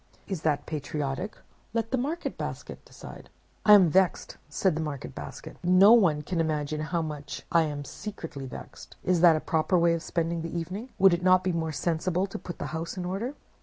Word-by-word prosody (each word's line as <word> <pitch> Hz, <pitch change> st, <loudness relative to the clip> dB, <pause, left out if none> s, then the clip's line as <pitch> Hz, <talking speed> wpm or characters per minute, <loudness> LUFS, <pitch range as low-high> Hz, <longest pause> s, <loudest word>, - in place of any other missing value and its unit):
Is 190 Hz, -6 st, -4 dB
that 150 Hz, -3 st, 0 dB
patriotic? 150 Hz, +4 st, -4 dB, 0.4 s
Let 225 Hz, -1 st, -1 dB
the 260 Hz, -, +2 dB
Market 305 Hz, +7 st, -3 dB
Basket -, -, -6 dB
decide.' -, -, -12 dB, 0.4 s
"'I -, -, +8 dB
am 190 Hz, -5 st, +7 dB
vexed,' 190 Hz, 0 st, +1 dB
said 185 Hz, +4 st, +1 dB
the 160 Hz, -, -2 dB
Market 150 Hz, -4 st, -5 dB
Basket. -, -, -9 dB
'No 185 Hz, +5 st, +7 dB
one 170 Hz, -10 st, +4 dB
can 175 Hz, +2 st, -2 dB
imagine 155 Hz, -1 st, -1 dB
how 165 Hz, +2 st, -1 dB
much 150 Hz, -2 st, -6 dB
I 165 Hz, -1 st, +4 dB
am 145 Hz, -1 st, -5 dB
secretly 165 Hz, -6 st, -7 dB
vexed. -, -, -10 dB
Is 180 Hz, -2 st, +2 dB
that 170 Hz, -2 st, +7 dB
a -, -, 0 dB
proper 160 Hz, +4 st, +1 dB
way 170 Hz, 0 st, +4 dB
of 165 Hz, -, -2 dB
spending 165 Hz, +1 st, -2 dB
the 165 Hz, +1 st, -4 dB
evening? 190 Hz, +9 st, -5 dB
Would 190 Hz, -2 st, +6 dB
it 175 Hz, -, 0 dB
not 185 Hz, 0 st, +5 dB
be 185 Hz, -, +1 dB
more 165 Hz, -2 st, -2 dB
sensible 170 Hz, +4 st, 0 dB
to 195 Hz, -, -7 dB
put 175 Hz, -, -8 dB
the -, -, -4 dB
house 165 Hz, +3 st, -4 dB
in 180 Hz, -, -3 dB
order? 210 Hz, +10 st, -3 dB
170 Hz, 205 wpm, -27 LUFS, 155-185 Hz, 0.4 s, I